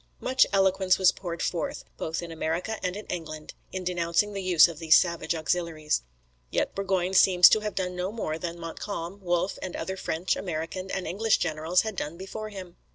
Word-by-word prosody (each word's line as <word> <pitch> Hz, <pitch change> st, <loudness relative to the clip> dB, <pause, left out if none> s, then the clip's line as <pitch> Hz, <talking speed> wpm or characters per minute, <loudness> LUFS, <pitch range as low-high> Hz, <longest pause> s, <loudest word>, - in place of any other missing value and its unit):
Much 260 Hz, +1 st, +3 dB
eloquence 190 Hz, -1 st, +3 dB
was 190 Hz, -1 st, +5 dB
poured 170 Hz, -3 st, -5 dB
forth, 170 Hz, -, -2 dB
both 160 Hz, +2 st, -3 dB
in 170 Hz, -, -7 dB
America 165 Hz, +7 st, -2 dB
and 180 Hz, 0 st, -1 dB
in 210 Hz, -, -7 dB
England, 155 Hz, -3 st, -6 dB, 0.2 s
in 185 Hz, -1 st, -4 dB
denouncing 175 Hz, +3 st, 0 dB
the 195 Hz, -, -3 dB
use 180 Hz, -4 st, +6 dB
of 165 Hz, -3 st, -8 dB
these 160 Hz, -1 st, +6 dB
savage 170 Hz, -1 st, 0 dB
auxiliaries. 160 Hz, -, -1 dB, 0.5 s
Yet -, -, -1 dB
Burgoyne 190 Hz, -2 st, -1 dB
seems 180 Hz, -2 st, +8 dB
to 215 Hz, -, +4 dB
have 210 Hz, -1 st, -4 dB
done 180 Hz, -1 st, -2 dB
no 180 Hz, +2 st, -2 dB
more 165 Hz, -8 st, -3 dB
than 170 Hz, 0 st, -5 dB
Montcalm, 170 Hz, +2 st, -6 dB
Wolfe, 175 Hz, +1 st, 0 dB
and 185 Hz, -, -5 dB
other 190 Hz, 0 st, -4 dB
French, 170 Hz, 0 st, -1 dB
American, 175 Hz, +2 st, -4 dB
and 190 Hz, -1 st, -3 dB
English 210 Hz, +6 st, +2 dB
generals 160 Hz, +3 st, +1 dB
had 220 Hz, -2 st, -4 dB
done 160 Hz, -1 st, -4 dB
before 215 Hz, +4 st, -6 dB
him. 185 Hz, -4 st, -9 dB
180 Hz, 190 wpm, -27 LUFS, 165-195 Hz, 0.5 s, seems